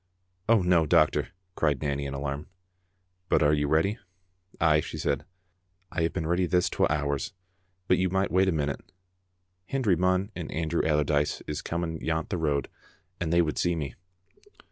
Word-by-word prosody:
"Oh, 115 -4 +5
no, 85 -3 +3
doctor," - - +3 0.3
cried 75 -6 0
Nanny 70 -1 -1
in 70 - -5
alarm. 70 +1 -4 0.4
" 90 -1 -46
But - - +4
you 75 -1 0
are - - -3
ready?" 80 +8 +2 0.6
"Ay," 80 -2 +4
she - - -5
said, - - -1 0.7
"I 85 - -1
have 80 - +1
been 80 -3 -3
ready 90 +2 +1
this 90 +1 +2
twa - - +2
hours, 75 +3 -1 0.5
but - - +3
you 95 0 +2
micht 95 0 0
wait 95 +2 +4
a - - +2
minute. 75 -3 -3 0.8
Hendry 125 -9 +2
Munn 95 +4 +1
and 85 -4 -5
An 80 0 -2
drew 85 - +1
Allardyce 75 -1 +1
is 75 - -4
coming 85 -1 -3
yont 80 +1 -1
the 90 - -1
road, 75 -4 0 0.5
and 85 -2 -2
they 85 0 +5
would 75 -2 -2
see 85 -1 +1
me." 70 -6 -4
80 Hz, 180 wpm, -28 LUFS, 75-90 Hz, 0.8 s, Oh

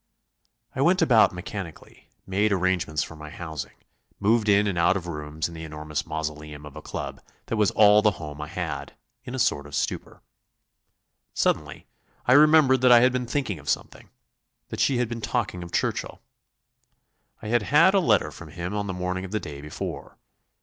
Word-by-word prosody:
I 130 - -1
went 175 +4 +4
about 115 -8 +5
mechanically, 90 -1 -9 0.2
made 100 +3 +1
arrangements 90 -5 0
for 80 - -10
my 75 -1 -10
housing, 80 -3 -7 0.4
moved 110 +1 +2
in 100 0 +5
and 100 -3 -1
out 85 +2 +3
of 90 - -7
rooms 75 -2 -4
in 85 - -11
the 80 0 -8
enormous 75 -1 -5
mausoleum 75 -1 -5
of 75 - -11
a - - -8
club - - -6 0.2
that - - -3
was 105 -2 +3
all 105 0 +6
the 105 - +4
home 75 -2 -7
I 75 - -5
had, - - -5 0.3
in 125 - -6
a - - -4
sort 70 - +1
of 75 - -7
stupor. - - -3 1.1
Suddenly - - -1 0.4
I 125 - +5
remembered 145 -3 +6
that 125 -1 +5
I 120 -1 +8
had 125 +1 +5
been 125 -1 -2
thinking 120 - -2
of 75 - -8
something; - - -3 0.6
that - - -6
she 135 - +2
had 120 -1 +1
been 115 0 -6
talking 110 -5 -2
of 85 -1 -8
Churchill. - - -2 1.2
I 105 - -5
had 120 0 +3
had 160 - +5
a 200 - +5
letter 110 - +2
from 85 - -11
him 85 +5 -5
on 105 -1 -2
the 95 - -3
morning 90 +1 -3
of 95 - -6
the 110 - -1
day 70 -6 -8
before. 75 +1 -7
95 Hz, 190 wpm, -25 LUFS, 80-120 Hz, 1.2 s, I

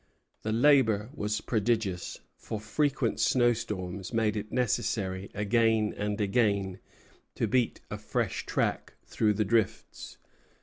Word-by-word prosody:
The 110 - -2
labor 115 -3 +4
was 105 -6 -2
prodigious; 110 -5 -1
for 110 - -6
frequent 135 +7 0
snowstorms 105 -7 0
made 110 -2 +1
it 105 0 -5
necessary 100 -5 -1
again 110 +1 +2
and 105 0 -2
again 100 -3 +1 0.6
to - - 0
beat 125 -2 0
a - - -4
fresh - - -2
track - - -1
through 105 -1 +1
the 110 +1 +1
drifts. 110 +1 -1
110 Hz, 120 wpm, -29 LUFS, 100-115 Hz, 0.6 s, labor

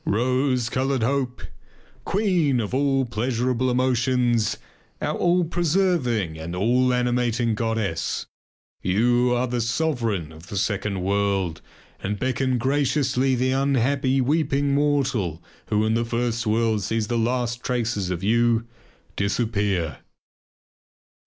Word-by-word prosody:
Rose 125 +2 +1
coloured 130 +1 0
hope! 130 0 -1 0.6
Queen 180 - +1
of 110 0 -3
all 135 0 +2
pleasurable 125 +2 0
emotions, 125 -2 +1 0.4
our - - -1
all 175 +1 +2
preserving 160 - 0
and 85 +2 -5
all 125 +6 +2
animating 120 -2 +1
goddess! 110 -7 -2 0.6
You 120 +6 +2
are 120 +1 +1
the 120 -1 -2
sovereign 115 - -1
of 80 +2 -14
the 100 - -5
second 100 -1 -1
world 100 -3 0 0.4
and 105 +1 -2
beckon 130 +2 0
graciously 135 0 +1
the 130 +1 +1
unhappy 135 0 +1
weeping 140 0 +1
mortal 135 - +1 0.3
who 105 0 +1
in 110 - +1
the 115 +1 +1
first 115 0 -1
world 110 -1 +1
sees 110 +3 -1
the 120 +2 -1
last 120 +1 -1
traces 115 -6 -1
of 90 0 -3
you 115 +2 +2 0.5
disappear. 100 - -1
120 Hz, 120 wpm, -24 LUFS, 105-130 Hz, 0.6 s, all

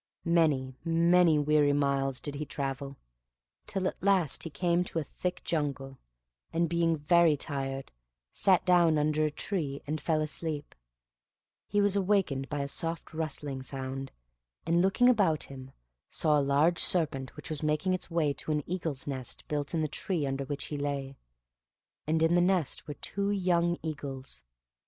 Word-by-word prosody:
Many, 155 -6 +2
many 170 0 +4
weary 150 -1 +3
miles 140 -2 +1
did 145 - -3
he 145 +1 -4
travel, 140 -1 -4 0.7
till 190 -2 -1
at - - -5
last 190 -6 +3
he 165 - -3
came 175 +2 +1
to 170 - -4
a 160 - +1
thick 180 +5 -4
jungle; 140 -4 -3 0.5
and, 170 +1 +1
being 165 0 +1
very 160 +1 +4
tired, 135 -2 -4 0.4
sat 190 -2 +3
down 175 -3 +4
under 150 +1 +1
a 155 - +2
tree 150 -3 -3
and 155 +1 -3
fell 160 -2 +1
asleep. 155 0 -4 0.9
He 205 +1 +1
was 205 -1 +3
awakened 190 -9 +1
by 145 -1 -2
a 140 - -2
soft 165 +3 -3
rustling 150 -4 -3
sound, 135 0 -4 0.5
and 170 +1 +3
looking 195 +6 +3
about 200 -11 +3
him, 130 -1 -10 0.4
saw 150 -2 +2
a - - +2
large 145 +5 +3
serpent 145 -7 +1
which 150 +1 -8
was 155 - -2
making 155 +4 +1
its 185 - -2
way 160 -4 +1
to 155 - -4
an 150 -1 0
eagle's 165 -6 -2
nest 130 -3 -4
built 150 +2 -2
in 160 - +1
the 155 - +1
tree 160 +1 -2
under 135 0 -2
which 140 0 -3
he 150 - -3
lay, 140 -1 -3 0.9
and 160 +1 +2
in 165 +1 +3
the 175 - +4
nest 180 -4 +1
were 145 - -5
two 200 +6 -2
young 175 -3 +1
eagles. 135 - -6
155 Hz, 165 wpm, -30 LUFS, 140-170 Hz, 0.9 s, many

